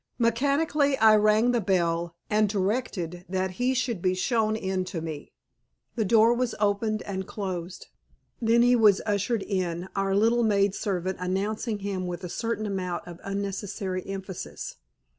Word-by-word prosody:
Mechanically 280 +4 +2
I 220 -2 +7
rang 215 +3 +4
the 240 -2 +1
bell 170 -3 0
and 210 -1 +2
directed 190 -4 -2
that 190 0 -1
he 255 +1 +2
should 235 -7 -1
be 185 0 +1
shown 220 +2 +1
in 190 -3 -1
to 180 -2 -4
me. 155 -2 -6 0.6
The 220 - 0
door 225 +3 +5
was 240 -1 -1
opened 215 +1 0
and 190 -1 -4
closed. 185 -3 -5 0.6
Then 235 +1 +4
he 245 0 +5
was 215 -4 +5
ushered 205 +1 0
in, 180 -2 -2
our 195 0 +1
little 230 +4 +3
maid 200 -3 +3
servant 190 -2 -2
announcing 205 +4 -1
him 190 -2 -2
with 180 +1 -5
a 180 - -5
certain 225 +2 -2
amount 185 -4 -3
of 175 -1 -9
unnecessary 195 -1 -3
emphasis. 195 -2 -6
200 Hz, 155 wpm, -27 LUFS, 185-225 Hz, 0.6 s, I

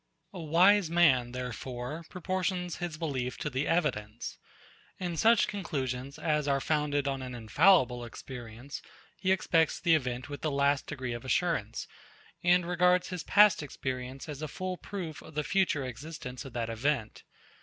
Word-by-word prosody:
A 180 - -6
wise 175 +4 +5
man, 140 -8 +4
therefore, 125 +4 -5
proportions 180 -1 -2
his 175 -3 -4
belief 130 -6 -2
to 150 - -3
the 130 +3 -1
evidence. 120 -10 -1 0.6
In 175 -2 -3
such 225 +6 +5
conclusions 135 -8 -3
as 150 -2 0
are 140 -1 +2
founded 145 -1 0
on 135 -1 -1
an 125 -1 -6
infallible 125 - +4
experience, 120 +1 -8 0.3
he 185 - 0
expects 165 -4 +2
the 170 - +3
event 125 -4 0
with 145 0 -7
the 155 - 0
last 140 0 +1
degree 130 -5 -4
of 120 - -6
assurance, 130 - 0 0.6
and 175 0 +4
regards 180 +1 +3
his 180 -2 -4
past 210 -4 +5
experience 130 -1 -5
as 150 -1 -6
a 155 - -2
full 185 +5 -4
proof 180 -5 -6
of 155 - -13
the 150 - 0
future 170 -6 +1
existence 130 0 -7
of 135 - -9
that 115 -1 -2
event. 115 -1 -1
145 Hz, 155 wpm, -30 LUFS, 125-175 Hz, 0.6 s, wise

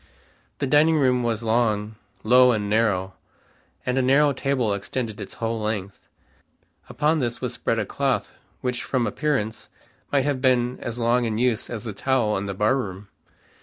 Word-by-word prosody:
The 140 - -1
dining 150 +4 +4
room 130 -3 +3
was 115 -1 -1
long, 110 -2 +1 0.3
low 125 +2 +6
and 105 -2 -2
narrow, 100 -3 +1 0.7
and 125 +1 +1
a - - +3
narrow 140 +3 +4
table 130 -5 0
extended 105 +3 -4
its - - -8
whole 115 -1 -2
length. 105 -2 -4 0.8
Upon 155 +2 +1
this 120 -3 -2
was - - -3
spread - - -1
a - - 0
cloth - - -1 0.3
which 125 -1 -2
from 130 -3 0
appearance 130 -8 -2 0.4
might 140 -2 +2
have 140 -3 -1
been 125 -1 +2
as 120 0 -5
long 120 +1 +2
in 110 -2 -1
use 120 -1 0
as 115 -2 -5
the 110 -3 -5
towel 120 -1 +1
in 100 +1 -3
the 100 - -4
barroom. 105 -3 -1
120 Hz, 165 wpm, -24 LUFS, 110-130 Hz, 0.8 s, low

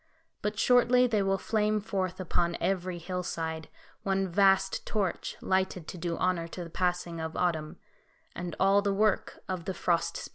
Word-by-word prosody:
But 210 +1 -2
shortly 250 +2 +5
they 220 -4 +2
will 195 0 +2
flame 215 +1 +1
forth 195 -3 -2
upon 170 -1 0
every 185 -2 -1
hillside, 165 -2 -4 0.3
one 195 0 0
vast 195 +1 +3
torch, 200 -5 -2
lighted 190 -3 0
to - - -7
do 170 0 -2
honour 180 -2 0
to 175 +1 -6
the 165 - -10
passing 175 -2 -1
of 160 0 -4
autumn; 165 -2 -1 0.6
and 175 -2 -5
all 195 +1 +5
the 200 -1 0
work 210 0 +1
of 185 -3 -4
the 190 - -3
Frost 170 -1 0
Spirit. - - -7
185 Hz, 170 wpm, -29 LUFS, 170-195 Hz, 0.6 s, shortly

